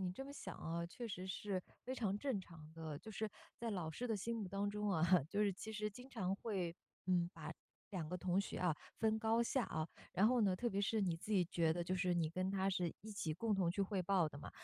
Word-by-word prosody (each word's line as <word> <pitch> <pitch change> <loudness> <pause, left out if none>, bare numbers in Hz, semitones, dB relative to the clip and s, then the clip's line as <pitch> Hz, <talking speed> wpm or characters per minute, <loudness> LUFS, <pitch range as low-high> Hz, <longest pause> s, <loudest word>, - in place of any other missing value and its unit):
你 185 -1 0
这 270 +8 -5
么 280 - -7
想 190 -10 -6
啊， 170 +1 -2
确 235 +7 -5
实 185 -2 -4
是 190 0 -1 0.2
非 255 - -2
常 205 -6 +1
正 260 -7 0
常 160 -4 -12
的。 160 -3 -4
就 220 - -9
是 220 +1 -1 0.3
在 235 -1 -1
老 175 -6 -1
师 245 +10 -3
的 225 - +1
心 230 +4 -1
目 210 -4 -2
当 200 +1 0
中 210 0 0
啊， 175 -1 +5
就 210 +1 +2
是 200 -2 +3
其 220 +4 -6
实 210 0 0
经 250 +6 -10
常 190 -5 0
会， 185 -7 -1 0.3
嗯， 175 -1 +3
把 - - -6 0.4
两 170 -6 -2
个 180 - -1
同 180 +2 +2
学 - - -3
啊 175 -4 +2 0.2
分 220 0 +3
高 225 +1 +4
下， 245 +1 +2
啊。 155 0 -1 0.3
然 200 +4 +5
后 250 -1 +4
呢， 190 -2 +4
特 240 +5 0
别 200 -1 0
是 215 +2 +2
你 180 -4 +2
自 210 +6 -4
己 190 -3 +5
觉 165 -3 +3
得 175 +1 0
就 180 +2 0
是 180 0 +2
你 170 -2 +2
跟 185 +3 0
他 195 0 +2
是 180 -3 +1
一 215 - -8
起 185 -6 -1
共 210 +6 +1
同 180 -3 +3
去 200 - -1
汇 195 -1 +1
报 180 -3 +4
的 145 - -9
嘛， - - -7
190 Hz, 280 characters per minute, -40 LUFS, 175-215 Hz, 0.4 s, 啊